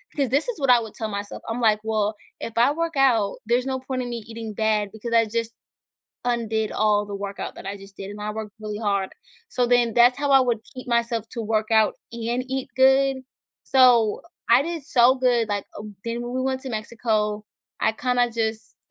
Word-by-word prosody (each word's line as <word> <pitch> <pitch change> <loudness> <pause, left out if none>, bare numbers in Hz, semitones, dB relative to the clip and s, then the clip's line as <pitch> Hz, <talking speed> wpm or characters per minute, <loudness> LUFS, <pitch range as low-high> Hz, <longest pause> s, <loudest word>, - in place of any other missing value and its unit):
'cause 275 -5 0
this 280 - +1
is 455 - -4
what 270 -2 0
I 245 - +7
would 220 -2 -8
tell 220 - -3
myself. 205 0 -6
I'm 230 +2 -3
like, 215 -2 +4
"Well, 215 -1 0 0.2
if 230 - -6
I 245 +4 +5
work 330 0 -2
out, 230 -7 +3
there's 245 +3 +1
no 260 -1 -1
point 260 0 -4
in 245 - -4
me 235 -2 -5
eating 225 -1 -7
bad, 210 -2 0
because 230 +2 -6
I 230 0 +5
just, 230 +1 -3 0.7
undid 225 -3 -1
all 210 -1 +2
the 200 -1 -6
workout 200 0 -5
that - - -10
I 200 +1 -4
just, 195 0 -14
did 195 0 -7
and 210 0 -9
I 210 0 -3
worked 215 -1 -6
really 210 -1 -5
hard," 200 -3 -1 0.4
so, 250 - 0
then 240 -2 +3
that's 245 +2 +6
how 285 -1 0
I 270 - +8
would 240 -4 0
keep 255 0 -8
myself 235 -2 0
to 235 - -5
work 220 0 -1
out 220 -1 +4 0.2
and 235 +2 -2
eat 265 0 -3
good, 265 +1 +4 0.5
so, 245 -5 +4 0.3
I 240 +3 +7
did 330 -1 -4
so 255 -3 +5
good, 245 -3 +2
like, 205 -1 -2
uh, 210 - -7 0.2
then 235 +1 -3
when 240 +1 -5
we 255 - -1
went 260 0 -1
to 265 - -6
Mexico, 215 -2 -2 0.3
I, 220 - +2
kinda 245 +1 +1
just, 220 -1 -3
230 Hz, 215 wpm, -24 LUFS, 215-255 Hz, 0.7 s, I